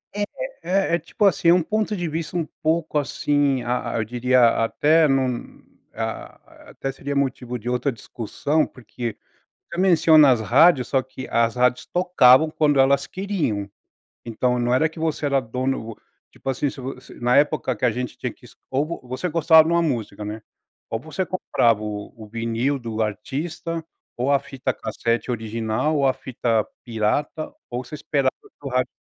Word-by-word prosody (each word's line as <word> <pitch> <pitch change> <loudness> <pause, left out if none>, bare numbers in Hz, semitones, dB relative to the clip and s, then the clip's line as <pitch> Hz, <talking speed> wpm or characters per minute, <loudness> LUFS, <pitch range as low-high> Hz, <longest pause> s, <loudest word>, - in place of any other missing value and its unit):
É 205 - 0 0.4
é 185 -2 +1
é - - -1
tipo 170 +6 -1
assim, 185 -3 +3
é - - +8
um 180 -2 +3
ponto 215 +2 -1
de 175 -2 -2
vista 165 +2 -3
um 165 - 0 0.2
pouco, 160 -1 0
assim, 140 -2 0
a 120 -1 -2
a - - 0
eu 110 - +1
diria 120 0 +3
até 155 +7 +3
num, 130 -3 -1 0.3
ah, 110 0 -7
até 135 - -4
seria 140 +1 -5
motivo 125 -3 -1
de 120 +1 -10
outra 125 +3 0
discussão, 125 +7 -2
porque 120 -1 -7 0.5
você 170 - -4
menciona 160 -5 +6
as 115 -3 +2
rádios, 130 +2 +5
só 135 - +2
que 130 0 -9
as 115 0 +2
rádios 125 0 +2
tocavam 160 -5 +5
quando 145 -3 +2
elas 140 +1 +3
queriam. 170 - -2 0.6
Então, 125 +2 0
não 120 0 +1
era 155 +5 +3
que 160 +1 -12
você 160 -2 -1
era 140 -1 +2
dono, 125 -2 -3 0.4
tipo, - - -6
assim, 135 +2 0
se 135 - -11
vo 130 0 -6
se - - -14
na 120 +2 +3
época 145 -3 +2
que 110 - -1
a 120 - +3
gente 125 +1 -5
tinha - - -3
que - - -20
es - - -16
ou 150 +5 -1
você 130 +8 -3
gostava 160 0 +6
de - - 0
uma 170 - +3
música, 110 -9 -2
né, 110 +1 -6 0.5
ou 115 - -2
você 155 +7 -3
comprava 120 - +1
o 105 -1 -5
o 110 -2 -10
vinil 115 +5 -1
do 115 -2 -4
artista, 155 +10 -4 0.3
ou 125 +3 +1
a 140 - +4
fita 135 -1 -3
cassete 115 +2 -2
original, 110 +5 -1
ou 140 - +3
a 130 - +3
fita 115 -4 -1 0.2
pirata, 120 +7 -1 0.2
ou 125 +1 -4
você 120 - -15
esperava 140 -3 0
ir - - -18
para 145 - -7
o - - -5
rádio 125 0 0
130 Hz, 185 wpm, -23 LUFS, 120-155 Hz, 0.6 s, é